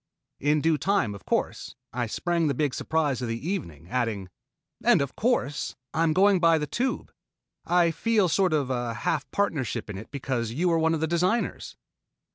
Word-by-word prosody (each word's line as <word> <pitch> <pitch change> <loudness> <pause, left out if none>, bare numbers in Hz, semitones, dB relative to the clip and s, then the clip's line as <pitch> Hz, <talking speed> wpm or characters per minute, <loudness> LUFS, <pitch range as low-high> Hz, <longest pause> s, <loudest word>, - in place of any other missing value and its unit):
In 150 +1 +2
due 160 -1 +2
time, 195 - +1
of 100 - -12
course, - - -2 0.2
I 120 -1 -1
sprang 170 +7 0
the 140 - 0
big 145 -1 0
surprise 150 -5 0
of 125 - -2
the 115 +7 -4
evening, 85 - -4
adding: 115 -7 -1 0.5
"And, - - +5
of 140 -1 -2
course, 210 - 0 0.2
I'm 165 0 +2
going 195 +3 +4
by 165 -1 +5
the 150 - -1
Tube, 255 - -2 0.6
I 175 -1 +4
feel 215 +2 +2
sort 185 +2 +2
of 140 -4 0
a 120 -2 -2
half 145 +4 -1
partnership 130 - -1
in 95 - -6
it 110 - -11
because 125 -5 -3
you 175 +7 +1
were 165 -1 +3
one 160 0 +2
of 155 - -4
the - - +2
designers." 180 +8 0
155 Hz, 185 wpm, -26 LUFS, 125-175 Hz, 0.6 s, And